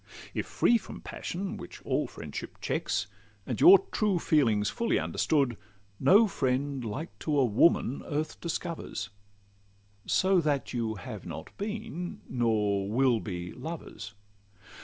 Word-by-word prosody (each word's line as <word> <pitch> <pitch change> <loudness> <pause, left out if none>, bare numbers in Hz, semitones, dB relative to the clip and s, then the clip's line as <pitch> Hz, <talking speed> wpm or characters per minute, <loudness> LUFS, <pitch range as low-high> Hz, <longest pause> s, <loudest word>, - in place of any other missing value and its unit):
If - - -2
free 235 - +3
from - - -10
passion, 190 +2 -5
which - - -9
all - - 0
friendship - - -8
checks, - - -1 0.4
And - - -3
your 380 +3 +11
true 210 -4 +2
feelings 115 -11 +2
fully 230 - 0
understood, 135 -7 +1 0.4
No 200 +12 +6
friend 135 -4 -1
like 125 +9 -5
to 150 -2 0
a 135 - +5
woman 125 +3 +3
earth 155 +1 -3
discovers, 165 - -4 1.0
So 190 -1 +3
that 145 -4 -1
you 115 -3 -1
have 95 - -8
not - - -8
been 210 -4 -5
nor 105 -5 +1
will 125 +1 +3
be 90 -4 -5
lovers. 115 -10 -7
140 Hz, 130 wpm, -29 LUFS, 110-175 Hz, 1.0 s, your